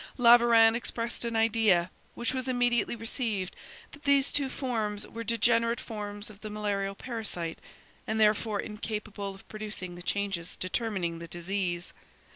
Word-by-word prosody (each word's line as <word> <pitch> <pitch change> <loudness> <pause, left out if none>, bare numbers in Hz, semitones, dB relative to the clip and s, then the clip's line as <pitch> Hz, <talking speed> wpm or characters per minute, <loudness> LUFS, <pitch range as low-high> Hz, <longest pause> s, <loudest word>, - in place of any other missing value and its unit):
Laveran 235 -2 +7
expressed 235 0 -2
an 230 -1 -2
idea, 220 -6 +3 0.2
which 240 +1 -1
was 260 -1 -2
immediately 245 -2 +2
received, 225 -4 -2 0.4
that 290 - -13
these 280 -1 +4
two 280 -2 +1
forms 220 -6 -2
were 230 - -6
degenerate 230 +1 +3
forms 205 -2 -5
of 205 0 -16
the 215 - -6
malarial 200 -2 -2
parasite, 200 -9 -4 0.5
and 220 0 0
therefore 215 0 +3
incapable 210 -2 -4
of 195 - -17
producing 210 -4 -5
the 175 - -9
changes 185 -1 -2
determining 185 -4 -2
the 170 - -7
disease. 175 +1 -2
215 Hz, 140 wpm, -29 LUFS, 195-235 Hz, 0.5 s, Laveran